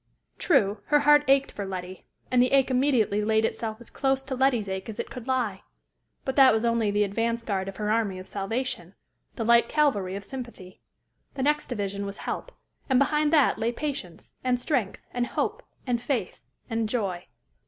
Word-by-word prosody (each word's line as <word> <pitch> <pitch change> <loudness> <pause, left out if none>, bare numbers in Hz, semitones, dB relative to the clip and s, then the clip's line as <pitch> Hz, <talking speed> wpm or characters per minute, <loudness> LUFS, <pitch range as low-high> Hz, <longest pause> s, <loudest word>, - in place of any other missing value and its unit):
True, 210 - +2
her 295 -1 +3
heart 295 0 +6
ached 275 0 +4
for 205 - -5
Letty; 185 -1 -6 0.3
and 250 -1 +5
the 255 +2 +2
ache 270 -1 +4
immediately 250 -6 +2
laid 220 +1 +2
itself 220 -1 -3
as 235 - -14
close 270 0 0
to 270 - -5
Letty's 255 -5 +2
ache 190 +2 -4
as 215 - -7
it - - -4
could 250 -1 -8
lie; 245 -7 -1 0.6
but 265 - -2
that 270 -2 +8
was 220 +1 0
only 230 -2 +2
the 205 +1 +2
advance 230 +3 -1
guard 195 -4 -2
of 195 - -7
her 210 0 -1
army 215 -4 0
of 185 - -8
salvation, 205 -2 -4 0.4
the 230 - -2
light 235 0 +5
cavalry 210 -12 +1
of 200 - -6
sympathy: 240 -8 -9 0.5
the 265 - -2
next 300 +2 +1
division 200 -4 -3
was 200 - -7
help; - - -5 0.4
and 260 - +4
behind 300 +2 +2
that 295 -8 +4
lay 225 +1 +1
patience, 240 - -6
and 250 -1 +1
strength, 245 - -2
and 245 0 -1
hope, - - -2 0.2
and 245 -2 0
faith, 250 0 -2 0.3
and 225 -2 -1
joy. 195 -7 -2
235 Hz, 190 wpm, -26 LUFS, 200-265 Hz, 0.6 s, that